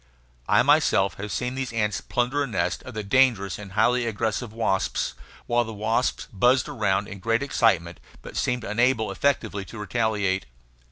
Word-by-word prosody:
I - - +4
have - - +4
myself 95 +1 +3
seen 125 +4 -2
these 130 -1 -3
ants 105 -4 -1
plunder 125 +4 -1
a 140 - 0
nest 115 - -1
of 130 - -10
the 110 - -3
dangerous 105 -4 +2
and 100 -2 -9
highly 120 +3 +2
aggressive 110 +1 -2
wasps, 110 -4 -1 0.3
while 120 0 +2
the 115 -1 -7
wasps 110 +4 0
buzzed 125 +8 +3
about 105 -8 0
in 100 -2 -8
great 115 +6 0
excitement, 90 -11 +1 0.2
but - - -10
seemed 125 -1 -1
unable 115 +1 +1
effectively 110 -8 0
to 115 - -10
retaliate. 105 - -1
110 Hz, 165 wpm, -25 LUFS, 100-125 Hz, 0.3 s, I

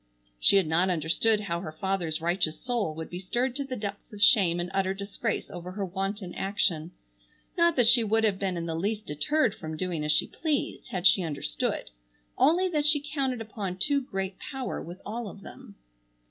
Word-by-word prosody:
She 200 - +6
had 195 -3 +5
not 170 +4 +3
understood 180 +6 +2
how 170 -4 -2
her 170 -3 -6
father's 170 -2 -1
righteous 170 -1 0
soul 235 -11 -1
would 160 0 -6
be 175 - -5
stirred 240 +7 -1
to 280 - -1
the 265 -2 -5
depths 205 0 -6
of 210 - -10
shame 195 -6 +5
and 175 0 -3
utter 195 0 0
disgrace 200 +3 -3
over 180 -1 -7
her 200 0 -2
wanton 195 0 -4
action. 185 -5 0 0.7
Not 340 -1 +3
that 245 -3 +4
she 235 0 +7
would 220 +1 +2
have 205 -3 +2
been 190 -3 -1
in 170 - -3
the 165 - -3
least 205 +6 -2
deterred 225 - +1
from 155 0 -7
doing 175 -3 -2
as 150 - +1
she 150 - +4
pleased 305 -3 -2
had 180 -1 -4
she 190 - +7
understood, 145 - -2 0.4
only 355 +5 +4
that 300 -3 +1
she 300 -1 +4
counted 265 -5 0
upon 205 -4 -5
too 280 +8 +1
great 195 -6 -4
power 265 -3 -4
with 175 +3 -9
all 225 +1 -4
of 200 - -12
them. - - -12
195 Hz, 200 wpm, -28 LUFS, 175-230 Hz, 0.7 s, she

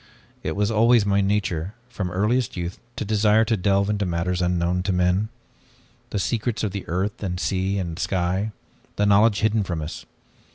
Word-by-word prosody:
It - - -3
was 105 +2 +1
always 115 0 +4
my 100 0 +2
nature, 95 -2 -1
from 105 -7 -4
earliest 105 +6 0
youth, 85 +1 -4 0.2
to - - -3
desire 105 +1 +3
to 115 - +1
delve 100 0 +2
into 105 -1 0
matters 90 0 -1
unknown 90 0 +1
to 95 - -1
men; 90 +3 +1 0.8
the - - -3
secrets 115 +3 -1
of 105 - 0
the 100 0 -6
earth 95 +4 -2
and 90 -3 -3
sea 95 +1 0
and 85 -3 -4
sky, 95 +3 0 0.5
the 105 - +1
knowledge 105 +1 +4
hidden 110 0 +2
from 90 -4 -3
us. 75 +1 -6
100 Hz, 175 wpm, -24 LUFS, 90-105 Hz, 0.8 s, always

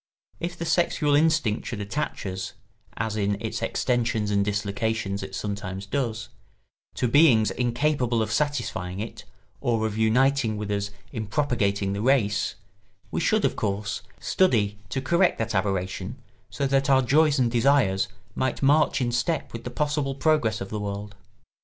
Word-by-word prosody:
If 175 +1 -4
the 170 - -4
sexual 160 -3 +2
instinct 155 -7 +2
should 115 - -4
attach 105 +7 -3
us 95 0 -4 0.4
(as 110 0 -2
in 100 -1 0
its - - -4
extensions 115 -4 0
and 100 -1 +3
dislocations 100 0 -1
it 95 0 -6
sometimes 100 -1 -4
does) 115 0 -2 0.7
to 125 - +1
beings 115 -6 +5
incapable 120 0 +1
of 110 - -4
satisfying 110 -9 -1
it 110 +2 -6 0.3
or 115 -2 0
of 110 0 -2
uniting 115 0 +3
with 105 0 -4
us 100 0 -1 0.2
in 110 -2 -4
propagating 100 -7 0
the 100 - -3
race, 110 -4 +2 0.6
we - - -1
should, 215 +4 +2
of - - +1
course, 100 -2 -2 0.2
study 105 - +2
to 130 +1 -2
correct 170 +4 +3
that 115 0 -2
aberration 95 +2 -2 0.3
so 140 - -2
that 135 +1 +2
our 130 -1 +5
joys 150 +4 +4
and 125 -3 +2
desires 120 -6 +3 0.3
might 130 +1 -1
march 145 +1 +4
in 120 -1 0
step 160 +7 -1
with 115 +1 -7
the - - -3
possible 145 0 -1
progress 140 -8 +1
of 95 - -5
the 105 - -2
world. 100 0 -5
115 Hz, 160 wpm, -25 LUFS, 100-140 Hz, 0.7 s, beings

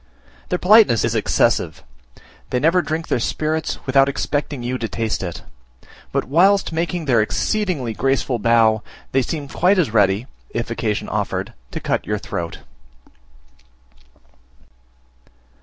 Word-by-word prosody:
Their 180 - +1
politeness 195 - +5
is 115 - 0
excessive; 110 -2 +1 0.7
they 125 - 0
never 165 +6 +3
drink 160 0 -3
their - - 0
spirits 155 +6 -2
without 135 0 +4
expecting 145 -1 -2
you 125 +1 -2
to 115 - -2
taste 115 -2 -2
it; 90 -3 -6 0.7
but - - 0
whilst 190 +9 +3
making 170 +1 -2
their 120 -5 +3
exceedingly 160 - -1
graceful 135 0 0
bow, 110 -1 +3 0.3
they 135 - +3
seem 145 +2 -4
quite 185 +7 +2
as 165 -11 +2
ready, 100 +1 +3 0.2
if 115 0 -4
occasion 110 -2 -2
offered, - - -3 0.2
to - - -5
cut - - -2
your - - 0
throat. 85 -1 -5
135 Hz, 130 wpm, -20 LUFS, 115-165 Hz, 0.7 s, politeness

